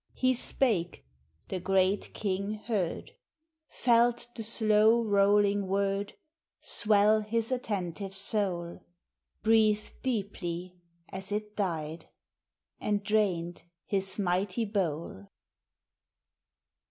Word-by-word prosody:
ir 255 0 +2
e - - +2
spake— 220 - 0 0.5
the 185 - -3
Great 190 +2 +1
King 200 +1 -2
heard; 210 - -3 0.6
Felt 240 -1 +2
the 230 - -5
slow 220 +1 +3
rolling 205 -1 +3
word 200 +1 -1 0.5
Swell 210 0 +3
his 225 +2 -1
attentive 195 -5 -3
soul; 190 -4 +1 0.6
Breathed 215 -1 +3
deeply 185 -7 -3 0.3
as 190 +1 -7
it 210 0 -3
died, 165 -5 -3 0.7
And 205 -1 -1
drained 185 -5 0 0.2
his 195 -1 -1
mighty 195 +3 0
howl. 160 - -2
205 Hz, 90 wpm, -29 LUFS, 185-215 Hz, 0.7 s, slow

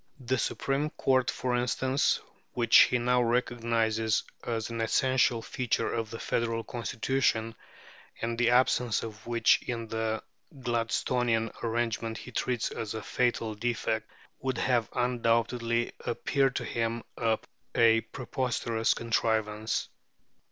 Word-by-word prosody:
The 130 0 -1
Supreme 140 +6 -1
Court, 130 -4 +1
for 125 -1 -1
instance, 130 +3 +1 0.3
which 120 -2 +2
he 125 - +6
now 125 +1 +2
recognizes 115 -2 +1 0.2
as 115 -1 -3
an 115 -1 -3
essential 120 0 +2
feature 125 -2 -1
of 115 -2 -2
the 115 - -6
Federal 115 0 -1
Constitution, 120 -1 -1 0.7
and 115 0 -2
the 120 0 +2
absence 125 -2 +3
of 110 -1 -8
which 115 -1 +4
in 115 -2 -4
the 110 0 -2 0.4
Gladstonian 115 -1 0
arrangement 115 -1 -1
he 125 - -9
treats 125 -1 -1
as 110 0 -4
a 110 - -5
fatal 120 -3 0
defect, 110 0 -2 0.3
would 130 -2 -2
have 120 -3 +1
undoubtedly 115 -1 +1
appeared 135 +2 +1
to - - -2
him 115 0 -2 0.7
a 115 -1 +5
preposterous 120 -3 -1
contrivance. 110 -2 0
115 Hz, 120 wpm, -29 LUFS, 115-125 Hz, 0.7 s, he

